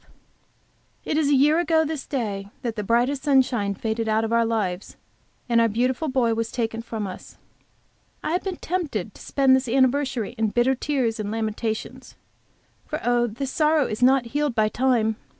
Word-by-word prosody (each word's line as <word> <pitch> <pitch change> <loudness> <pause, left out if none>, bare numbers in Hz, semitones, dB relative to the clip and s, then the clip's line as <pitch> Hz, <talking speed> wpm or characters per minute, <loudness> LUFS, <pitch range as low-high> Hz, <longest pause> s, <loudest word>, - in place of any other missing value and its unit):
It - - -1
is 305 -2 +2
a 290 - +4
year 300 +4 +4
ago 325 -2 +2
this 310 -2 -5
day 205 -7 -3 0.2
that 235 -3 -2
the 210 - -2
brightest 245 +6 +1
sunshine 250 -8 +2
faded 220 +2 -2
out 220 +1 +2
of 225 - -2
our 230 0 +3
lives, 200 -5 -2 0.5
and 235 -1 +3
our 230 - +4
beautiful 250 +7 0
boy 255 -4 +1
was 225 0 -2
taken 225 -2 -2
from 225 -2 -5
us. 185 -2 -9 0.9
I - - -2
have 355 - 0
been 375 -3 -4
tempted 285 - -3
to - - -15
spend 270 -2 +3
this 260 -2 -1
anniversary 260 -2 +1
in 220 - +2
bitter 240 +5 +2
tears 255 -4 -1
and 210 -1 -3
lamentations. 220 0 -4 0.7
For 305 - -3
oh, 240 0 +2
this 255 +5 -5
sorrow 305 -2 +3
is 215 0 -4
not 260 0 +4
healed 290 -4 0
by 215 -1 +2
time! 230 -3 +1
240 Hz, 180 wpm, -24 LUFS, 220-275 Hz, 0.9 s, a